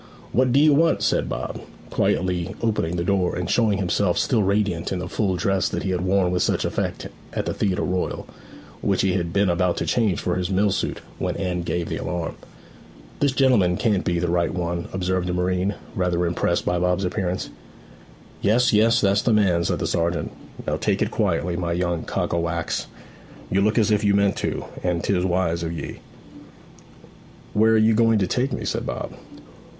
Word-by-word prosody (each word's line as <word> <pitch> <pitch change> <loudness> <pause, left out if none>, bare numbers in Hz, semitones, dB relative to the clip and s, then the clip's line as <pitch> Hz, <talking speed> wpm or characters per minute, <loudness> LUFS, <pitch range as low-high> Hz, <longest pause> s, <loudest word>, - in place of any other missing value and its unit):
'What 130 +1 +2
d'ye 145 +4 +5
want?' 160 +3 +3
said - - +1
Bob, - - -4 0.3
quietly 90 -1 0
opening 105 -7 0
the 85 - -1
door, 95 -1 +1
and 90 -1 -3
showing 110 -4 +2
himself 95 -3 +1
still 110 - +2
radiant 100 -3 0
in 95 - -1
the 90 0 -4
full 95 -1 0
dress 95 +1 +1
that - - -3
he 95 - -1
had 90 -1 -1
worn 95 -1 +2
with 90 - 0
such - - +1
effect - - -2 0.3
at - - -2
the - - -2
Theatre 95 -3 0
Royal, 90 0 -2 0.6
which - - +1
he 95 -2 +2
had 85 -2 -1
been 100 +2 +2
about 90 0 +1
to - - -1
change 110 -6 +1
for 90 0 -1
his 90 0 -2
mill 100 +1 +2
suit 95 - -2 0.2
when - - -2
Anne 90 -2 -2
gave 85 0 -2
the - - -3
alarm. 85 -2 -3 0.9
'This 140 -2 +2
gentleman 115 -10 +3
can't 105 -5 +1
be 85 - 0
the 90 +1 0
right 85 -1 +1
one,' 85 -1 -3
observed 95 -1 -1
a 90 - -1
marine, 90 +2 0 0.2
rather 90 -1 0
impressed 85 0 0
by 90 - +1
Bob's 90 +2 +1
appearance. 90 0 -2 0.9
'Yes, 120 +4 +3
yes; 110 +2 +4
that's 100 0 +3
the 120 - +1
man,' 95 -5 +3
said - - 0
the - - -2
sergeant. 85 0 -1 0.3
'Now - - -1
take - - +1
it - - -3
quietly, 90 0 0
my 85 -1 -1
young 85 -1 -1
cock - - -2
o' 85 - +1
wax. 85 0 -2 0.6
You 95 - +2
look 105 +3 +2
as 110 -1 +3
if 105 0 +2
you 100 -1 +3
meant 100 -1 +3
to, - - -2 0.2
and 90 -2 -1
'tis 90 -2 +1
wise 90 -2 0
of 85 -1 -3
ye.' 85 - -6 1.5
'Where 110 +1 +4
are - - +5
you 110 +1 +4
going 115 0 +4
to 100 - +2
take 125 +8 0
me?' - - -3
said - - -2
Bob. - - -4
95 Hz, 195 wpm, -23 LUFS, 90-105 Hz, 1.5 s, d'ye